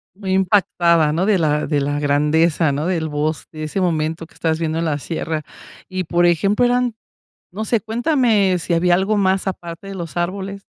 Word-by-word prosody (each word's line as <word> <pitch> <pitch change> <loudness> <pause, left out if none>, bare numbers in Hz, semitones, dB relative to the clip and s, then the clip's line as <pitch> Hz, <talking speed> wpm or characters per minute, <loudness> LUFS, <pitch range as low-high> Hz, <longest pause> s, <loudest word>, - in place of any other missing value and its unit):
Muy 195 -2 -5
impactada, 175 -5 +3
¿no? 170 +4 0
De 205 -2 +3
la 150 -2 +1
de 145 -2 0
la 145 +1 -1
grandeza, 150 +2 +2
¿no?, 150 +5 -2
del 165 -4 -1
bosque. 155 +1 -3
De - - -4
ese 175 +6 -3
momento 160 -1 -1
que - - -22
estabas 160 -1 -1
viviendo 160 0 -1
en 170 - -1
la 150 -3 0
sierra. 160 0 -4 0.4
Y 185 -1 -3
por 175 +1 +2
ejemplo, 195 +8 +2
eran 245 -2 +1 0.6
no 215 +3 -4
sé. 225 -1 +1
Cuéntame, 225 - +2
si 170 0 -1
había 175 +1 +3
algo 195 +4 +1
más, 190 -1 +1
aparte 175 0 -6
de 195 - -7
los 170 -3 -7
árboles. 195 +3 -3
175 Hz, 195 wpm, -20 LUFS, 160-195 Hz, 0.6 s, impactada